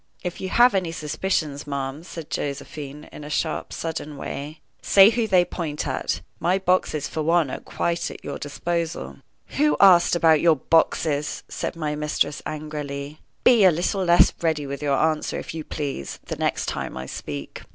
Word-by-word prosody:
"If 180 -1 -4
you 190 - -3
have 245 +4 +5
any 185 -4 0
suspicions, 150 -2 -2
ma'am," 140 +1 -3
said 165 -3 -9
Josephine, 145 +1 -5
in 150 - -10
a 150 - -8
sharp, 155 +1 -2
sudden 155 -3 -5
way, 145 +3 -6 0.2
"say 195 +2 +7
who 230 -1 0
they 185 -3 +4
point 155 -5 -4
at. - - -2 0.2
My 180 +2 +2
boxes, 180 -5 +1
for 160 - -3
one, 165 -3 +2
are - - -4
quite 170 0 -2
at - - -11
your 140 - -5
disposal." 165 +3 -3 0.4
"Who 300 +1 +3
asked 180 -3 +6
about 160 -3 +4
your 165 -2 +5
boxes?" 150 0 +1
said - - -4
my 155 -2 -2
mistress, 150 -1 -1
angrily. 150 -1 -5 0.2
"Be 235 -4 +6
a 190 - +8
little 180 +3 0
less 175 -1 +5
ready 160 -3 0
with 140 +1 -5
your 140 -2 +1
answer, 155 -1 0
if - - -6
you 160 -1 -5
please, 140 - -4
the - - -4
next - - -1
time - - -4
I 65 - -5
speak." 70 +1 -7
155 Hz, 175 wpm, -24 LUFS, 145-175 Hz, 0.4 s, a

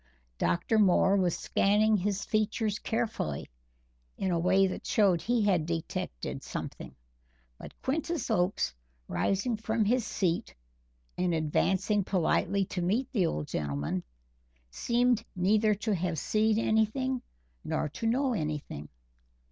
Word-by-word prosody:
Dr. 175 +6 +1
Moore 190 0 +4
was 180 -4 +1
scanning 215 +2 +3
his 200 0 -1
features 215 0 0
carefully 220 - -2 0.7
in 190 - -1
a 170 - +1
way 190 +3 +4
that 185 - -3
showed 190 -6 +3
he 240 -1 +1
had 180 -6 +2
detected 165 - -4
something, - - -7 0.6
but - - -11
Quintus 315 +1 -1
Oakes, 180 - +1 0.3
rising 195 - 0
from 220 0 0
his 245 +3 +2
seat 180 -5 -1 0.6
and 180 -2 +1
advancing 190 +6 +1
politely 190 +1 +1
to 180 - -4
meet 215 +9 0
the 195 -10 +2
old 75 - -3
gentleman, 75 +4 -2 0.7
seemed 240 - +1
neither 210 +4 +3
to 215 +1 -1
have 175 -2 -1
seen 215 +7 +2
anything 230 +4 +1 0.4
nor - - -1
to 225 +10 -4
know 260 +3 +2
anything. 150 - -4
200 Hz, 125 wpm, -29 LUFS, 175-220 Hz, 0.7 s, Moore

